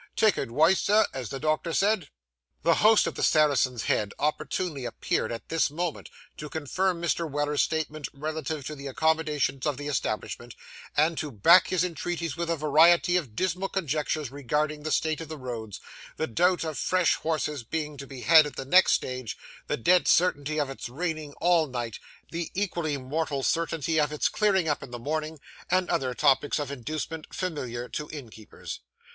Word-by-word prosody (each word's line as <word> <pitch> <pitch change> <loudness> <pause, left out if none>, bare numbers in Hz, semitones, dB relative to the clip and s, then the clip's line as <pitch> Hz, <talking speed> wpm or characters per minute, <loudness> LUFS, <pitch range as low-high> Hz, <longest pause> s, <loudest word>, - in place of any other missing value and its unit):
Take 215 -2 +4
adwice, 155 +9 +3
sir, 210 +2 +4
as 125 -5 -5
the 135 - -5
doctor 155 +2 0
said.' 195 -5 +1 0.5
The - - +5
host 215 +1 +6
of - - -2
the - - -6
Saracen's 135 -6 +3
Head 105 -2 0
opportunely 150 0 -2
appeared 120 - -2
at 115 - -7
this 165 -3 +2
moment, 165 +2 -4 0.3
to 150 - -7
confirm 170 +5 -1
Mr. 170 -1 -1
Weller's 145 +1 0
statement 155 -2 -2
relative 155 0 -4
to 155 - -4
the 140 -1 -8
accommodations 150 -2 0
of 145 -3 -1
the 145 0 -5
establishment, 120 -3 -3 0.4
and 155 +2 +3
to 150 - -3
back 170 - +6
his 180 -2 +1
entreaties 170 -3 -3
with 170 0 -3
a 165 - +2
variety 165 +4 +4
of 145 -12 -1
dismal 185 - -1
conjectures 155 -5 -2
regarding 150 +2 -1
the 155 +1 -4
state 160 0 0
of 165 - -7
the 155 - -6
roads, 115 -6 -6 0.4
the 160 - 0
doubt 175 +9 +2
of 155 -3 -4
fresh 185 -2 +2
horses 150 -4 -2
being 150 +4 -3
to 140 0 -8
be 130 -2 -9
had 160 +2 +7
at 145 - -9
the 135 - -5
next 180 +7 +5
stage, 125 -5 -2 0.3
the - - -1
dead 180 +9 +3
certainty 155 -3 +2
of 145 - +1
its 135 -2 -7
raining 155 +1 -4
all 170 -1 +2
night, 120 -4 -4 0.3
the 170 0 -3
equally 170 -7 -1
mortal 140 +1 -2
certainty 165 0 0
of 150 -1 +1
its 150 - +1
clearing 195 -5 +2
up 150 - 0
in 135 - -9
the 120 - -6
morning, 155 +4 -3 0.3
and 185 0 +1
other 130 -7 0
topics 145 0 +3
of 145 -2 -3
inducement 155 +4 -5
familiar 125 -9 -4
to 150 +3 -5
innkeepers. 115 -7 -9
155 Hz, 180 wpm, -27 LUFS, 140-165 Hz, 0.5 s, had